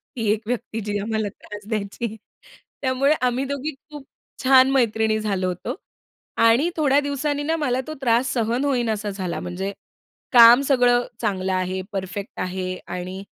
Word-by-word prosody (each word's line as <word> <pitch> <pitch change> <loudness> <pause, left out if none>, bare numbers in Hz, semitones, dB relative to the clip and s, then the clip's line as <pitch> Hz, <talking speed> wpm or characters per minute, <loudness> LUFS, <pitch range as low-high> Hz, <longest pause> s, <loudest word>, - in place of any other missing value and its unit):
ती 225 -4 -1
एक 215 0 0
व्यक्ती 230 -2 -3
जी 205 0 -2
आम्हाला 220 +1 -2
त्रास 210 0 -10
द्यायची. 215 +1 -3 0.7
त्यामुळे 265 +2 +2
आम्ही 250 +1 +1
दोघी 280 +2 -3 0.2
खूप 295 -2 -9 0.4
छान 260 0 +6
मैत्रिणी 220 -4 +2
झालो 195 -4 -1
होतो. 180 -1 -4 0.6
आणि 230 +8 +4
थोड्या 285 -3 +3
दिवसांनी 285 0 -2
ना, 320 +2 0
मला 260 -5 0
तो 310 - -4
त्रास 240 0 +2
सहन 235 +3 0
होईना 245 -5 +1
असा 210 0 -4
झाला 185 -5 -4
म्हणजे 190 +3 -4 0.6
काम 240 +1 +9
सगळं 245 -2 +4 0.2
चांगलं 190 -4 -1
आहे, 185 0 -1
परफेक्ट 195 +3 -5
आहे 185 0 -3
आणि 185 +2 -6
230 Hz, 155 wpm, -23 LUFS, 200-260 Hz, 0.7 s, काम